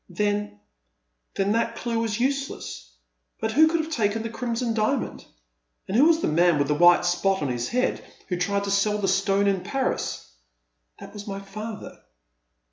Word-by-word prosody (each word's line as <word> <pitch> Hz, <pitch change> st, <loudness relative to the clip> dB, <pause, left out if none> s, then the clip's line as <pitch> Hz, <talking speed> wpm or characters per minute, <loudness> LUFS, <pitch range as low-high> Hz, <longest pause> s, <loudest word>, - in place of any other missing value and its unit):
" -, -, -46 dB
Then 205 Hz, -, -2 dB, 0.3 s
— -, -, -51 dB
then 195 Hz, +1 st, +1 dB
that 230 Hz, +1 st, 0 dB
clue 230 Hz, -1 st, -2 dB
was 225 Hz, -1 st, -1 dB
useless; 265 Hz, -, -3 dB, 0.5 s
but 220 Hz, -, -1 dB
who 315 Hz, +7 st, +6 dB
could 330 Hz, 0 st, +1 dB
have 315 Hz, +1 st, -6 dB
taken 220 Hz, -3 st, 0 dB
the 225 Hz, -, -5 dB
Crimson 235 Hz, 0 st, -2 dB
Diamond? 225 Hz, +4 st, -1 dB, 0.6 s
And 190 Hz, -, -3 dB
who 265 Hz, +6 st, +6 dB
was 330 Hz, 0 st, +4 dB
the -, -, +1 dB
man 170 Hz, +1 st, +3 dB
with 145 Hz, -1 st, +1 dB
the -, -, +3 dB
white 175 Hz, +4 st, +5 dB
spot 190 Hz, 0 st, +1 dB
on 140 Hz, -, -1 dB
his 120 Hz, -1 st, -2 dB
head 250 Hz, +1 st, 0 dB, 0.2 s
who 180 Hz, -, -2 dB
tried 200 Hz, +3 st, 0 dB
to 200 Hz, -, -2 dB
sell 210 Hz, +1 st, +2 dB
the 200 Hz, -2 st, -1 dB
stone 195 Hz, +1 st, +2 dB
in 195 Hz, -2 st, +1 dB
Paris? 265 Hz, -, -2 dB, 0.4 s
" -, -, -34 dB
That -, -, -11 dB
was 205 Hz, 0 st, -9 dB
my 195 Hz, -1 st, -4 dB
father. 215 Hz, +2 st, -8 dB
200 Hz, 195 wpm, -25 LUFS, 175-230 Hz, 0.6 s, who